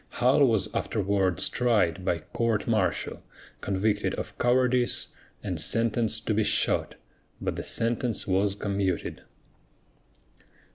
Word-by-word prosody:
Hull 135 +3 +4
was 110 -5 +1
afterwards 95 -4 0
tried 105 -8 +1
by 90 -2 +1 0.2
court 115 -3 0
martial, 110 -5 0 0.4
convicted 105 +1 0
of - - -6
cowardice, 125 0 +2 0.3
and - - -3
sentenced 115 -1 0
to 110 - +1
be 110 +1 +2
shot, - - +1 0.4
but - - -3
the - - -4
sentence 115 0 -1
was 95 +1 +1
commuted. 100 -3 -2
110 Hz, 110 wpm, -27 LUFS, 100-120 Hz, 0.4 s, Hull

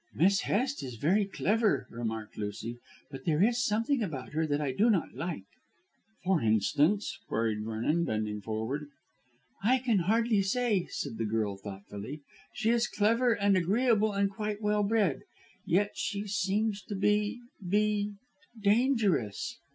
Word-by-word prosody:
"Miss 195 +4 +4
Hest 260 +6 0
is 125 -3 -6
very 185 - +2
clever," 210 +3 +1
remarked 110 -2 -4
Lucy, 105 +3 -5 0.3
"but 135 - -8
there 160 +1 +3
is 240 +2 +2
something 230 +5 +1
about 150 - -4
her 160 +1 0
that 145 -1 0
I 145 -3 -1
do 210 - +3
not 195 -7 +1
like." 150 - -4 0.8
"For 185 -3 +2
instance?" 145 - +2
queried 110 -2 -1
Vernon 115 +10 0
bending 105 -3 -2
forward. 110 +8 -3 0.8
"I 250 +5 +4
can 240 -5 +1
hardly 220 +3 +2
say," 205 -1 +1
said 115 - -5
the 115 - 0
girl 105 -2 -1
thoughtfully. 100 +7 -8 0.3
"She 230 -1 +1
is 235 0 +2
clever 230 +4 +2
and 200 -2 +2
agreeable 215 +4 +2
and 200 0 +1
quite 210 0 -3
well 210 -1 +1
bred. 205 -7 +2 0.5
Yet 200 +4 +2
she 205 0 -3
seems 205 +2 0
to 205 - -5
be 210 +3 +1 0.2
be 205 +2 +1 0.5
dangerous." 205 - +1
195 Hz, 145 wpm, -30 LUFS, 130-215 Hz, 0.8 s, Miss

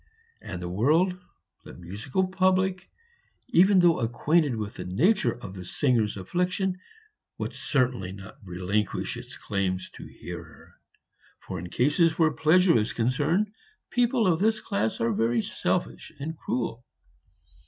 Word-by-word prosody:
And 90 - -6
the 90 - -5
world, 150 - +2 0.5
the - - -11
musical 105 - -2
public, 185 0 +1 0.6
even 190 +3 +5
though 170 -2 +4
acquainted 145 +4 +1
with 105 -2 -4
the - - -7
nature 130 - +2
of 95 -5 -8
the 95 -2 -8
singer's 110 +1 +1
affliction, 180 - -1 0.6
would - - -4
certainly 125 - 0
not 95 +6 -11
relinquish 95 +2 -2
its - - -10
claims 95 -2 -2
to - - -10
hear - - -8
her, - - -17 0.7
for 95 - -5
in 90 +1 -7
cases 150 - +2
where 160 -2 +4
pleasure 170 -2 +4
is 105 - -2
concerned 150 - +1 0.4
people 245 -2 +2
of 170 -3 +3
this 220 +2 +2
class 110 - -2
are 115 0 +1
very 115 0 +1
selfish 60 0 -2
and 160 +3 -4
cruel. 120 -5 -3
130 Hz, 140 wpm, -27 LUFS, -, 0.7 s, even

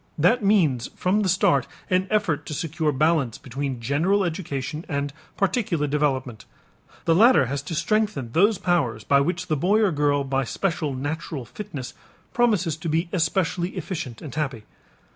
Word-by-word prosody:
That 195 +10 +3
means 160 - +3
from 185 +3 +1
the 200 -3 +1
start 180 -6 +3 0.2
an 185 +1 +1
effort 185 -9 0
to 150 - -4
secure 160 0 -1
balance 150 -4 +1
between 135 0 -4
general 160 - +1
education 155 -3 -3
and 140 -2 -2 0.2
particular 195 - 0
development. 135 -6 -1 0.6
The 165 - +4
latter 225 - +6
has 140 +3 -3
to 145 +3 -5
strengthen 185 - 0
those 200 - +4
powers 135 - 0
by 140 +6 +4
which 175 +5 -1
the 155 - 0
boy 185 +9 +2
or 210 -4 +3
girl 145 -2 +1
by 135 0 0
special 155 0 -2
natural 145 0 -4
fitness 140 - -7 0.4
promises 205 -10 +2
to 160 +1 -4
be 165 +3 0
especially 175 +1 0
efficient 150 - -5
and 145 - -7
happy. 140 -8 -3
155 Hz, 160 wpm, -24 LUFS, 140-185 Hz, 0.6 s, latter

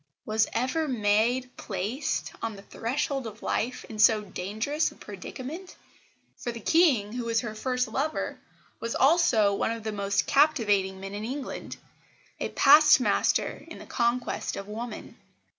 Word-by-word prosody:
Was 220 0 +2
ever 260 +7 0
maid 240 +2 +1
placed, 210 +8 -3
on 225 -2 -3
the 195 - -12
threshold 270 +3 -2
of 215 0 -10
life, 245 +3 -2
in 215 - -9
so 215 0 +5
dangerous 215 - -2
a - - -16
predicament? 260 - -8 0.6
For 240 - -4
the 235 - -7
King, 250 - +3
who 245 -1 -3
was 230 -1 +1
her 220 -3 -5
first 250 +3 -1
lover, 275 +7 -2 0.4
was 230 0 -3
also 260 -9 +4
one 200 - 0
of 230 -1 -4
the 220 - -2
most 200 -1 0
captivating 210 -10 +2
men 195 +1 -7
in 205 +1 -5
England, 265 +4 -5 0.6
a - - -2
past 295 +1 +7
master 250 - +1
in - - -9
the - - -11
conquest 240 0 -1
of 195 - -6
woman. 230 +3 -7
230 Hz, 155 wpm, -27 LUFS, 210-265 Hz, 0.6 s, past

